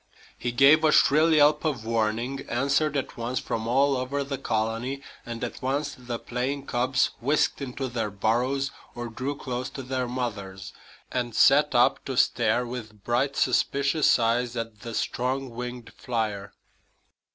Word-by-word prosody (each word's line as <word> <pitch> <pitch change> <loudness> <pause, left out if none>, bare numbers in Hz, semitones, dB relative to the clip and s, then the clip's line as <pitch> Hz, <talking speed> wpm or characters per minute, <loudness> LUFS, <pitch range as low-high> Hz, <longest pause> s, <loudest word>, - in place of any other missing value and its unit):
He 120 - -3
gave 140 +6 +6
a 155 - +5
shrill 155 +3 +5
yelp 150 -1 +5
of 135 -8 -2
warning, 115 +4 -1
answered 140 +4 +1
at 135 - -4
once 120 +2 -3
from 110 0 -3
all 135 +3 +3
over 130 +2 -2
the 140 -1 -5
colony; 115 +4 -2 0.2
and 120 0 -5
at 120 - -5
once 140 +3 -1
the 125 -3 -5
playing 130 +4 -3
cubs 125 +1 +1
whisked 145 +3 +1
into 135 0 -4
their 115 -3 -2
burrows 125 +7 0 0.2
or 120 0 -5
drew 130 +5 -4
close 125 -2 -4
to 135 - -7
their 130 0 -2
mothers, 100 -6 -5 0.4
and 120 -3 -2
sat 145 0 +5
up 120 0 +4
to 135 -2 -4
stare 120 0 +2
with 110 -4 -8
bright, 135 +4 0
suspicious 140 +4 +2
eyes 120 +1 0
at 115 -2 -5
the 115 -2 -7
strong 130 +1 -2
winged 120 -1 -7
flier. 105 -5 -3
125 Hz, 155 wpm, -26 LUFS, 115-140 Hz, 0.4 s, gave